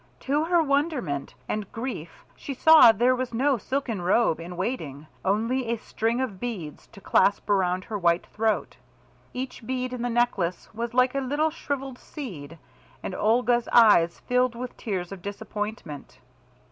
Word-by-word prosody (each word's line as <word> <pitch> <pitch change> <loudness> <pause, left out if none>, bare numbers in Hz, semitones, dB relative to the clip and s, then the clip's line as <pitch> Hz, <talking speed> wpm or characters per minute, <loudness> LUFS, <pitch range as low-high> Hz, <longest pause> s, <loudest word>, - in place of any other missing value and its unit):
To 290 +3 0
her 345 -1 +3
wonderment 280 - -1
and 210 -2 -3
grief 225 -9 -6
she 275 - -6
saw 315 -3 +8
there 245 +4 +2
was 250 -2 -4
no 265 +1 +2
silken 250 -5 -3
robe 180 -1 +2
in 175 +1 -8
waiting, 155 - -4 0.2
only 230 +6 0
a 235 0 0
string 225 +2 -2
of 210 -8 -4
beads 195 -12 -6
to 210 - -15
clasp 200 +1 +2
around 185 -2 +1
her 210 +1 -5
white 170 -1 +2
throat. 220 0 -1 0.5
Each 250 -1 -6
bead 255 +1 -3
in 250 - -4
the 245 - -1
necklace 225 -7 -1
was 235 +2 -4
like 250 0 +4
a 275 - 0
little 290 +4 0
shrivelled 275 -4 -5
seed, 170 - -8 0.5
and - - -4
Olga's 240 +3 +2
eyes 205 -8 +5
filled 250 -1 +1
with 250 +1 -6
tears 185 -5 -4
of 195 -2 -8
disappointment. 205 - -6
230 Hz, 160 wpm, -26 LUFS, 190-255 Hz, 0.5 s, saw